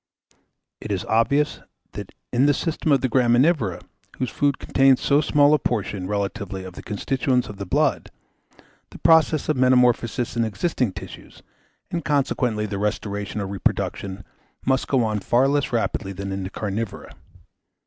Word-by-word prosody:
It 105 - -6
is 95 -3 -2
obvious, 140 +7 +1 0.3
that - - -8 0.2
in 130 +4 +4
the 145 - +3
system 160 -2 -1
of 135 -2 +4
the 130 - +1
graminivora, 120 - +2 0.3
whose 130 -2 -2
food 140 -1 +1
contains 135 -1 +3
so 145 +1 +3
small 145 -1 +4
a 150 - +4
portion, 105 -6 -2
relatively, 100 -1 -3
of 95 -1 -9
the - - -9
constituents 125 +4 -1
of 105 - -8
the 100 -1 -6
blood, - - +1 0.8
the - - -12
process 160 -2 +4
of 155 - +1
metamorphosis 125 -1 +2
in 115 - +1
existing 110 - -1
tissues, - - -11 0.5
and 170 -1 -2
consequently 130 -7 0
their 100 -2 -4
restoration 105 0 -3
or - - -2
reproduction, 95 0 -2 0.4
must 130 0 +1
go 130 -3 +2
on 110 -1 -1
far 120 +6 +2
less 145 0 0
rapidly 110 -4 -1
than 100 +1 -5
in 95 0 -3
the 95 - -4
carnivora. 105 +1 -4
120 Hz, 160 wpm, -23 LUFS, 100-135 Hz, 0.8 s, in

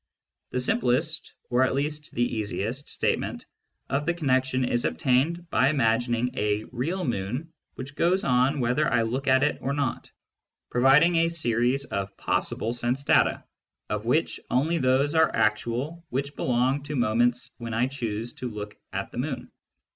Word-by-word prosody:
The 125 - -2
simplest, 130 +5 0 0.2
or 125 +1 +3
at 130 0 +2
least 150 +2 -2
the 120 - +2
easiest, 110 +4 -3
statement - - -1 0.4
of 145 +2 -1
the 170 - +1
connection 130 -4 +1
is 120 -1 +1
obtained 160 +6 +1
by 130 - +4
imagining 120 -2 +1
a 105 -2 0
"real" 165 +10 -2
moon 125 +8 -3 0.2
which 140 +2 -8
goes 180 +5 +2
on 130 +3 +2
whether 125 +5 +1
1 120 -2 +2
look 130 +5 -3
at 130 0 +4
it 150 - +1
or 140 - -1
not, 140 -4 -2 0.6
providing 140 +7 +5
a 165 0 +3
series 130 -3 0
of 100 -5 -4
possible 115 +2 -1
sense 120 +3 -1
data - - +3 0.5
of - - -2
which - - +1
only 160 +7 +1
those 130 +3 +2
are 160 0 +4
actual 120 +10 0
which 140 +2 -3
belong 130 +3 +1
to 145 +1 -5
moments 120 0 +1
when 115 -1 -5
1 120 +3 +1
choose 115 -3 -4
to 125 - -5
look 105 -1 -7 0.2
at - - -4
the - - -5
moon. - - -4
130 Hz, 160 wpm, -26 LUFS, 120-145 Hz, 0.6 s, providing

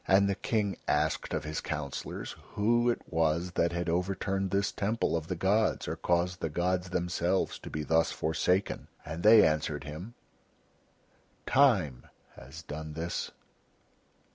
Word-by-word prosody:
And 100 +1 +5
the 100 - +1
King 100 -1 -1
asked - - 0
of - - -1
his 75 0 -3
councillors 70 -3 -5 0.2
who 120 +3 +3
it 120 - -1
was 80 +2 +1
that 85 -1 +1
had 85 +1 -2
overturned 95 +2 -1
this 100 +1 +1
temple 105 -2 0
of 80 -1 -3
the 90 - -2
gods 100 +5 +1
or - - -2
caused 90 +1 0
the 80 - -2
gods 90 +3 0
Themselves 90 +1 0
to - - -9
be 75 - -3
thus 80 +2 +2
forsaken. 90 +5 0 0.2
And 80 +3 -5
they 110 +2 +8
answered 75 -1 0
him: 85 - -8 1.3
"Time 100 - +3 0.3
has 80 +6 -11
done 80 0 -6
this." 85 +2 -3
90 Hz, 145 wpm, -30 LUFS, 80-100 Hz, 1.3 s, they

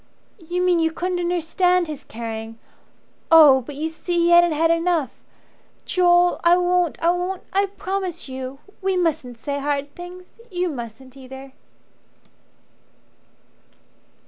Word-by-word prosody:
"You 350 +1 -3
mean 360 -2 +3
you 325 0 +1
couldn't 360 +2 -3
understand 355 +1 +1
his 305 -3 -7
caring. 225 0 -7 0.7
Oh, 300 -5 +8
but 280 +3 -10
you 305 +3 -2
see 345 +2 -4
he 340 0 +3
hadn't 345 0 +6
had 325 +2 +2
enough 335 -5 +1 0.7
Joel, 355 -1 +3
I 340 +1 +5
won't 355 -2 +1
I 340 - +4
won't 360 +1 -3
I 395 +1 +2
promise 380 -4 -4
you. 260 0 -7 0.2
We 380 -1 0
mustn't 315 -8 -1
say 280 +4 -4
hard 285 0 -2
things. 360 +3 -12
You 360 -2 -1
mustn't 250 -1 -8
either." 265 0 -11
335 Hz, 130 wpm, -22 LUFS, 275-360 Hz, 0.7 s, Oh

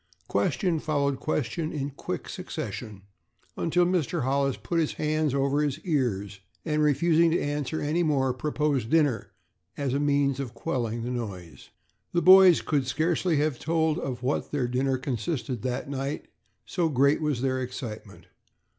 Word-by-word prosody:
Question 165 - 0
followed 140 -3 0
question 155 +2 -2
in 140 -2 -3
quick 135 - -5
succession, 100 -3 -6 0.5
until 175 +2 +2
Mr. 175 -3 0
Hollis 135 +1 +1
put 170 - -2
his 160 - 0
hands 155 -2 0
over 140 +1 +1
his 145 -3 -1
ears, 105 - -1 0.3
and, 155 -2 +1
refusing 165 +3 +4
to 165 - +1
answer 145 +1 -2
any 155 +4 0
more, 135 -5 +2
proposed 145 -2 -1
dinner 145 -9 +2 0.5
as 140 -3 -1
a 140 - +1
means 140 -2 +1
of 125 -4 -5
quelling 120 -4 -2
the 125 - -3
noise. 95 - -6 0.4
The 175 - +2
boys 185 -2 +8
could 140 -4 0
scarcely 160 +3 +1
have 150 -3 0
told 160 0 +1
of 125 -5 -4
what 135 +3 -1
their 135 -4 0
dinner 130 +2 0
consisted 125 -1 -3
that 125 +1 -3
night, 140 +1 -3 0.4
so 170 -4 0
great 140 +2 +3
was 150 -6 0
their 130 -1 0
excitement. 115 -5 -7
140 Hz, 155 wpm, -27 LUFS, 125-155 Hz, 0.5 s, boys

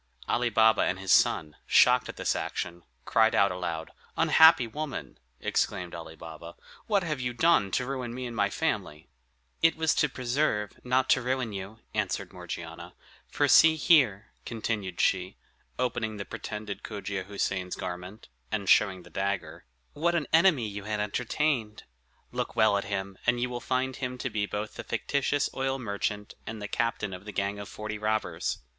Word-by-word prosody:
Ali 120 0 +1
Baba 110 0 +5
and 95 - +1
his 95 -1 -2
son, 75 -1 +3
shocked - - +5
at - - -6
this - - 0
action, 85 -1 -4 0.2
cried 110 0 +3
out 100 0 +4
aloud. 85 -3 -4 0.3
"Unhappy 160 -6 +7
woman!" 135 - -6 0.2
exclaimed 90 -2 -1
Ali 80 -1 -8
Baba, 80 +1 -10 0.3
"what 205 -4 +2
have 155 -5 -2
you 125 -1 -2
done, 160 -9 +4
to 125 +5 0
ruin 130 -2 -4
me 125 +1 -5
and 120 -1 -6
my - - +2
family?" 75 +1 -2 0.5
"It 165 0 +5
was 160 -1 +2
to 150 - +2
preserve, 125 -5 0
not 130 +1 +2
to 125 - +4
ruin 125 -3 -1
you," 100 +3 -7
answered - - -2
Morgiana; 85 -1 -7 0.3
"for - - +1
see 160 0 +7
here," 125 - +3
continued 105 -5 -3
she, 95 0 +1 0.4
opening 120 -3 -1
the 100 - -5
pretended 105 -1 -6
Cogia 100 -3 -5
Houssain's 95 -2 -2
garment, 90 +3 -7 0.2
and 100 -3 -2
showing 95 -3 +4
the - - -16
dagger, 95 -5 -3 0.3
"what 170 +3 +1
an 165 -3 +1
enemy 160 - +5
you 100 -1 -6
had 105 0 -2
entertained! 115 +1 -1 0.5
Look - - -3
well 100 - +4
at 100 - -1
him, 100 -1 -4
and 120 0 +3
you 125 +1 -1
will 120 - -3
find 130 0 -1
him 125 -1 -4
to 125 0 -3
be 105 -1 -1
both 105 +1 -4
the - - -7
fictitious 140 0 0
oil 135 0 -1
merchant, 105 -3 -3
and 110 0 -5
the 105 - -5
captain 110 -3 -1
of 90 - -8
the 105 - -6
gang 100 +1 -2
of 100 - -7
forty 105 0 -5
robbers. 105 -6 -1
105 Hz, 175 wpm, -28 LUFS, 95-125 Hz, 0.5 s, Unhappy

